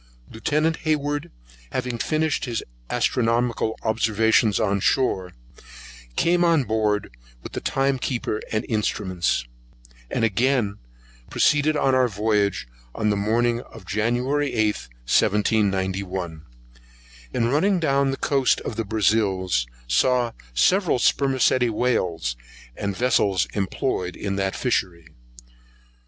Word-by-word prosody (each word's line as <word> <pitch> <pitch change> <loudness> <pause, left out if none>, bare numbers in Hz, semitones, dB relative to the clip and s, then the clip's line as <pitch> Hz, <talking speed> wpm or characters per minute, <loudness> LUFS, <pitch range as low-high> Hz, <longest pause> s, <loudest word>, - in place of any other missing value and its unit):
Lieutenant 155 +8 0
Hayward 145 -2 -1 0.4
having 125 -2 -3
finished 155 +1 0
his 120 -3 -3 0.3
astronomical 115 -1 0
observations 110 -1 +2
on 100 -2 +1
shore, 95 -5 +1 0.8
came 175 +1 +2
on 165 -4 +3
board 105 - -1 0.3
with - - -8
the - - -5
time 135 0 0
keeper 120 -4 -2
and 110 - -1
instruments, 95 - -1 0.6
and - - +1
again 115 -1 +1 0.5
proceeded 150 +1 +2
on 135 -2 +2
our 130 -1 +4
voyage, 105 - 0 0.3
on 105 0 +1
the - - +1
morning 115 +4 +1
of 115 -5 -14
January 125 +8 0
8, 110 -2 +2 0.3
1791. 95 - 0 0.8
In 115 - 0
running 180 +8 +2
down 140 -3 +2
the 135 - -2
coast 135 -3 +2
of 110 - -5
the 115 - 0
Brazils, 95 - +1 0.2
saw 120 - +2 0.2
several 180 - +3
spermacæti 130 -1 +2
whales, 90 - 0 0.4
and 100 -1 -3
vessels 105 -6 +2
employed 95 -2 -2
on 100 -1 -1
that 95 0 -1
fishery. 90 -10 -1
115 Hz, 115 wpm, -23 LUFS, 100-130 Hz, 0.8 s, our